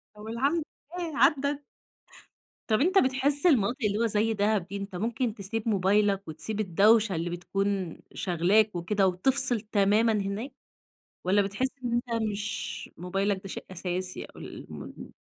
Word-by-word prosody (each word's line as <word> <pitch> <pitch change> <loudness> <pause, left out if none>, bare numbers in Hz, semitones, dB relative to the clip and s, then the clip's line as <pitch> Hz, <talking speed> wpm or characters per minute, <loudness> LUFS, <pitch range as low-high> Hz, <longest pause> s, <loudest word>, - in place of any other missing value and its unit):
طب 210 +1 -10
الحمدلله 310 +5 -3
عدّت. 285 0 +1 1.1
طب 220 +3 +2
أنت 375 +5 +3
بتحس 275 +2 +2
المناطق 250 - +4
اللي 205 0 +1
هو 230 - +2
زي 220 +1 +2
دهب 205 -3 +1
دي، 200 +1 -5
أنت 195 -2 -6
ممكن 225 +3 -1
تسيب 215 +2 -4
موبايلك 200 -1 +2
وتسيب 215 +7 -4
الدوشة 210 +1 +4
اللي 165 +2 -2
بتكون 190 0 -2 0.2
شاغلاك 190 +3 +2
وكده 190 +3 +1
وتفصل 235 +5 +3
تمامًا 215 +1 +3
هناك؟ 205 +6 -2 0.7
والّا 200 +3 +3
بتحس 200 +7 -1 0.2
إن 240 -1 -1
أنت 235 -1 -1
مش 205 +1 -4
موبايلك 195 +3 -1
ده 195 - -8
شيء - - -6
أساسي 185 +1 -3
أو - - -18
المون - - -9
210 Hz, 140 wpm, -28 LUFS, 195-235 Hz, 1.1 s, المناطق